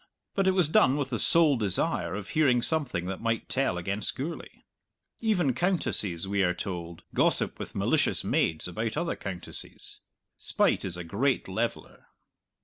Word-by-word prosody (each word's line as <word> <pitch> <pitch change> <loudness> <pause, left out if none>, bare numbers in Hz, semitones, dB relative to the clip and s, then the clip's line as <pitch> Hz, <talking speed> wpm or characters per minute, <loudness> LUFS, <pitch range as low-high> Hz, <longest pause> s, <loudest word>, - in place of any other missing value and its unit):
But 195 -1 +1
it 190 - +4
was 180 -5 +3
done 155 -5 +4
with 140 -2 -3
the 115 - -1
sole 160 -5 +5
desire 100 -2 0
of 100 -1 -6
hearing 130 -6 +3
something 140 - 0
that 95 +1 -5
might 115 0 -1
tell 135 -9 0
against 100 +4 -2
Gourlay. 155 +6 -7 0.6
Even 180 - +1
countesses, 105 - 0
we 100 0 0
are 90 -1 +2
told, 85 -3 -6
gossip - - +2
with - - -7
malicious - - +2
maids 80 +1 0
about 110 +7 -3
other 170 +1 -1
countesses. 90 -4 -5 0.4
Spite - - +1
is 90 -3 -2
a 90 - -5
great 120 +11 0
leveller. 110 +5 -4
115 Hz, 155 wpm, -28 LUFS, 95-150 Hz, 0.6 s, sole